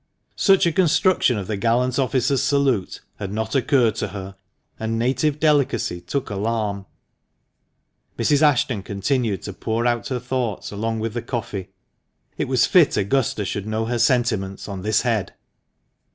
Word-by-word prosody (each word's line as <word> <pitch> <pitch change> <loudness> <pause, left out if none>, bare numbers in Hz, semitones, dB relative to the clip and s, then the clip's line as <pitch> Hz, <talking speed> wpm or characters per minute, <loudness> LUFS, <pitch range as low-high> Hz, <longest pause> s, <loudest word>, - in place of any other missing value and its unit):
Such 195 -3 +4
a 170 - +3
construction 175 - +3
of 100 - -4
the 105 +1 -3
gallant 120 +5 +1
officer's 130 0 +1
salute 135 -9 0 0.2
had 100 -1 -5
not 110 +1 -3
occurred 130 -4 +3
to - - -1
her, 95 -1 -8 0.4
and 110 0 -2
native 135 +5 0
delicacy 140 - +1
took 105 +8 -3
alarm. 100 -1 -2 1.3
Mrs. 145 -1 +2
Ashton 130 -7 +2
continued 105 +1 -1
to 100 - -6
pour 115 +4 -2
out 120 -1 0
her 130 -2 -2
thoughts 125 -3 -3
along 110 +2 -2
with 115 -1 -3
the 120 - -3
coffee. 105 -6 -5 0.7
It - - -2
was - - +3
fit - - +4
Augusta 110 -1 0
should 100 +2 -4
know 110 +1 -1
her 120 +1 -2
sentiments 115 -5 +1
on 100 -2 -6
this 105 +2 +1
head. 115 -5 -1
115 Hz, 150 wpm, -22 LUFS, 105-130 Hz, 1.3 s, Such